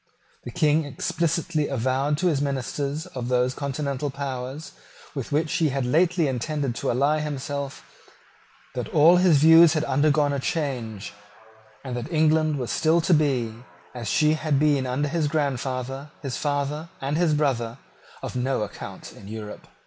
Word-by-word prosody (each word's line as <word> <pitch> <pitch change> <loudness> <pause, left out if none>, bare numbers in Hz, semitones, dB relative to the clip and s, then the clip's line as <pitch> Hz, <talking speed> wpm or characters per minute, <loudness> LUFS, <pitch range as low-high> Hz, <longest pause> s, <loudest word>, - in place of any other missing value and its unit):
The - - -5
King 155 -2 +2
explicitly 155 +2 -1
avowed 135 +3 0
to 185 - -2
the 140 - 0
ministers 140 +3 -2
of 125 -9 -6
those 125 0 +1
continental 140 0 -3
powers 135 +1 -5 0.4
with 135 -5 -5
which 155 +2 0
he 160 -2 +2
had 135 -1 -1
lately 170 +4 +2
intended 135 +1 -2
to - - -2
ally 140 +5 +2
himself, 140 -1 -4 0.9
that - - -4
all 165 +4 +6
his 180 -4 +5
views 165 +2 +7
had 155 -2 0
undergone 145 +1 +2
a 140 - -1
change, 120 - -3 0.7
and 130 -3 -5
that 120 +7 -5
England 155 -1 +2
was 125 -3 -3
still 160 +1 +3
to 175 - +2
be, 135 -7 +1 0.4
as 120 -3 -6
she 155 0 +3
had 155 -2 0
been 145 -2 +2
under 135 +4 -1
his 155 0 0
grandfather, 135 -2 -2
his 135 -3 -3
father, 145 +2 -2
and 140 +2 -2
his 160 -2 +2
brother, 125 -5 0 0.5
of - - -5
no 125 -2 0
account 100 - -8
in 100 - -13
Europe. 105 -1 -8
145 Hz, 155 wpm, -25 LUFS, 130-155 Hz, 0.9 s, views